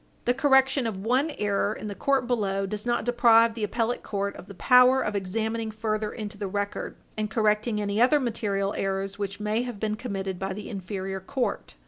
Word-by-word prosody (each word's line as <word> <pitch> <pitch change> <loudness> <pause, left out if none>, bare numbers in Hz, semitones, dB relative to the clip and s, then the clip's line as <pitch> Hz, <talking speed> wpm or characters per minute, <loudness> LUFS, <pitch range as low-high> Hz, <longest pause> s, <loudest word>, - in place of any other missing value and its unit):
The 245 - +3
correction 265 -1 +3
of 195 -2 -5
one 260 +6 +2
error 205 0 0
in - - -7
the 205 - -4
court 270 +4 +1
below 200 -5 0
does 210 +3 -5
not 240 -2 0
deprive 230 -1 +5
the 225 -1 -5
appellate 230 +3 -1
court 200 -1 -3
of - - -11
the 200 - -10
power 250 +4 +6
of 210 - -2
examining 220 +4 -2
further 215 -1 -2
into 210 -2 -7
the 205 - -2
record, 205 +1 -3 0.2
and 215 -1 -2
correcting 215 0 +1
any 205 +1 0
other 290 +5 +5
material 205 -5 -1
errors 195 +1 -2
which 200 0 -4
may 215 +2 0
have 245 -4 -5
been 215 0 -1
committed 195 -5 -4
by 195 0 -2
the 210 +2 -7
inferior 190 -1 -4
court. 250 +6 -3
215 Hz, 195 wpm, -26 LUFS, 200-240 Hz, 0.2 s, power